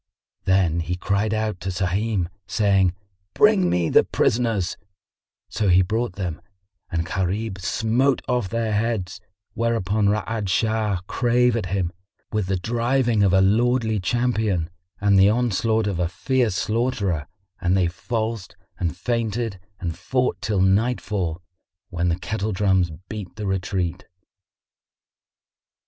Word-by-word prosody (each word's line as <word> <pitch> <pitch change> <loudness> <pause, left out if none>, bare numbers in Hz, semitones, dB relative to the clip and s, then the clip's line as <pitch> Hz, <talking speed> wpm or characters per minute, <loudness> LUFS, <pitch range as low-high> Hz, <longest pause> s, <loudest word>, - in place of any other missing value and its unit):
Then 95 -3 +3
he 85 +2 -2
cried 100 +4 0
out 110 -3 -1
to 95 - -4
Sahim, 95 +1 0 0.2
saying, 95 -4 +2 0.4
"Bring 210 -4 +5
me 85 -2 +1
the - - +5
prisoners;" 110 -6 0 0.7
so 105 -2 -1
he 90 +1 +6
brought 110 +3 -1
them, 90 -5 -4 0.5
and 85 -1 -1
Gharib 95 +3 -2
smote 120 +7 +1
off 125 -6 0
their 115 0 -1
heads; 105 -4 -1 0.3
whereupon 110 -3 +1
Ra'ad 105 0 -1
Shah 110 -2 +1
drave 125 0 +2
at 110 -5 -2
him, 90 -2 -1 0.4
with 105 -4 -1
the 95 0 0
driving 120 +3 +1
of 100 -2 +4
a 95 +1 +5
lordly 110 +2 +2
champion 110 -5 0 0.3
and 100 -1 +4
the 95 +1 +7
onslaught 110 -1 +1
of 100 -4 -2
a 85 -2 +1
fierce 120 +3 0
slaughterer 105 - -1 0.3
and 90 +1 +2
they 95 - +3
falsed 110 +3 -3 0.2
and 85 -1 -2
feinted 115 -1 -2 0.2
and 85 -3 -3
fought 125 -1 -1
till 105 -4 0
nightfall, 95 -4 0 0.5
when 85 +1 0
the 85 - 0
kettle 110 +2 -3
drums 95 -2 +2 0.2
beat 105 -5 -7
the 105 - -5
retreat. 95 -1 -2
100 Hz, 130 wpm, -23 LUFS, 90-115 Hz, 0.7 s, the